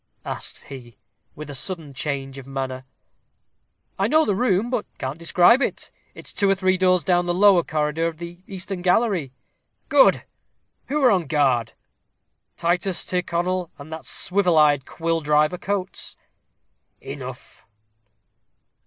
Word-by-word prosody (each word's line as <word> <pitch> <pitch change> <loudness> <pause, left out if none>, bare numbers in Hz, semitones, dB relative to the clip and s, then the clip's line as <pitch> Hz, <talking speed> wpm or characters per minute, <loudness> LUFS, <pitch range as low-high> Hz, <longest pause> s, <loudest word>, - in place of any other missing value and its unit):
asked - - -5
he, 120 -5 -11 0.4
with 150 -1 -8
a 145 - -7
sudden 150 +1 -4
change 135 -1 -4
of 135 - -12
manner. 130 -1 -4 1.1
"I - - +2
know 315 +1 +4
the 205 - +1
room, 220 +1 +1
but 225 - -1
can't 135 +5 -5
describe 180 +9 +4
it; - - -3 0.2
it's - - -10
two 200 - +1
or 195 - +4
three 185 0 +2
doors 185 -1 +3
down 175 -1 +2
the 175 - 0
lower 195 -1 +6
corridor 155 +1 -1
of 165 -1 -5
the 170 +1 -9
eastern 190 -1 -5
gallery." 180 - +1 0.6
"Good. - - +5 0.6
Who 295 +1 -1
are 250 - +6
on 180 -6 +1
guard?" 130 -7 +1 0.8
"Titus 180 +2 0
Tyrconnel 180 0 -1
and 145 +2 -11
that 160 0 -7
swivel 180 -3 +1
eyed 145 -3 +4
quill 165 0 -1
driver, 150 +3 +2
Coates." 200 -2 -4 0.8
"Enough." - - -9
175 Hz, 140 wpm, -23 LUFS, 150-190 Hz, 1.1 s, lower